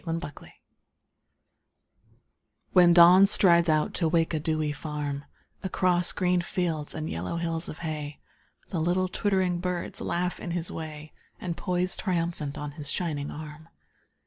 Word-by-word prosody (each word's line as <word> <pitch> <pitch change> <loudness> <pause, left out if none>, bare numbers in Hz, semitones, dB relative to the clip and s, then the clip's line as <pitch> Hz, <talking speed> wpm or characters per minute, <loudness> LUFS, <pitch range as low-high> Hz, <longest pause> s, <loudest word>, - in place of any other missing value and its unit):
Alarm 165 -2 -2
Clocks 145 -4 -9 2.2
When 175 -1 +7
Dawn 175 +3 +8
strides 170 -4 +5
out 155 -1 +2
to 165 - +1
wake 165 0 +1
a 155 - 0
dewy 155 -1 -1
farm 145 -1 -4 0.4
Across 180 -2 +1
green 180 -1 +1
fields 170 -4 -2
and 155 0 -3
yellow 85 - -3
hills 165 -1 -3
of 155 - -7
hay 150 -2 -5 0.5
The 170 - -2
little 180 +3 +1
twittering 185 -2 0
birds 180 -1 -3
laugh 180 +1 -1
in - - -6
his 165 -1 -4
way 155 -1 -7 0.3
And 170 -2 -3
poise 180 0 -1
triumphant 170 -6 -2
on 150 0 -5
his 145 -1 -5
shining 150 -5 -2
arm. 155 +1 -9
165 Hz, 145 wpm, -27 LUFS, 155-180 Hz, 2.2 s, Dawn